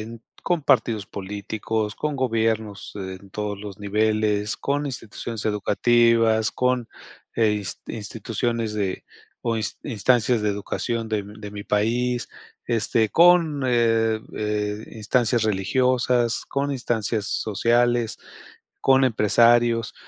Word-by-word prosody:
en 115 +1 -10 0.2
con 175 -4 0
partidos 110 -7 +2
políticos, 105 +2 -4
con 150 -1 -2
gobiernos 110 -5 -1
en 95 -1 -8
todos 105 0 -4
los 100 -1 -9
niveles, 105 0 0
con 145 +1 -1
instituciones 115 -3 -6
educativas, 115 +1 +3
con 125 -2 0 0.5
eh, 115 -1 +3
ins 100 -4 -4
instituciones 115 +1 -3
de 100 -3 -2 0.4
o 115 -1 0
ins 110 -2 -3
instancias 120 -1 +1
de 105 - +1
educación 115 +3 -3
de 110 -1 0
m 100 +1 -8
de 105 -1 -7
mi 100 0 -8
país. 120 +4 0 0.4
Este, 115 -1 +2
con, 165 -4 +5
eh, 115 -2 +2 0.2
eh, 105 0 -2
instancias 115 +1 +1
religiosas, 120 +3 +1
con 140 +1 -1
instancias 115 -4 -1
sociales, 120 +3 +1 0.6
con 135 0 +4
empresarios 115 -1 +3
110 Hz, 115 wpm, -23 LUFS, 105-120 Hz, 0.6 s, con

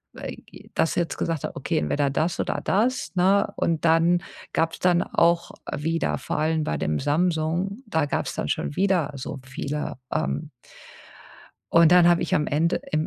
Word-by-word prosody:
äh, - - -6
g - - -16
das 160 - +1
jetzt 170 -1 -1
gesagt 165 -3 -2
habe: - - -6
„Okay, - - -2
entweder 140 - 0
das 160 +5 -1
oder - - -2
das”, 215 -4 0
ne? 195 +3 +3
Und 165 -1 0
dann 165 +2 +4 0.3
gab's 165 0 0
dann 175 -1 +3
auch 170 0 +2 0.3
wieder, 165 +2 -1
vor - - -3
allem 160 0 +1
bei 75 - -1
dem 75 +1 -1
Samsung, 170 - 0
da 160 -7 +1
gab's 145 - -2
dann - - -2
schon - - -2
wieder 185 -6 +1
so 135 +1 -6
viele, 140 +1 -4 0.2
ähm. 155 -1 -2 1.2
Und 165 -1 +6
dann 175 -1 +7
habe 175 0 +4
ich 170 - 0
am 150 - +1
Ende 160 +4 +1
im 155 - +1
165 Hz, 175 wpm, -24 LUFS, 150-175 Hz, 1.2 s, dann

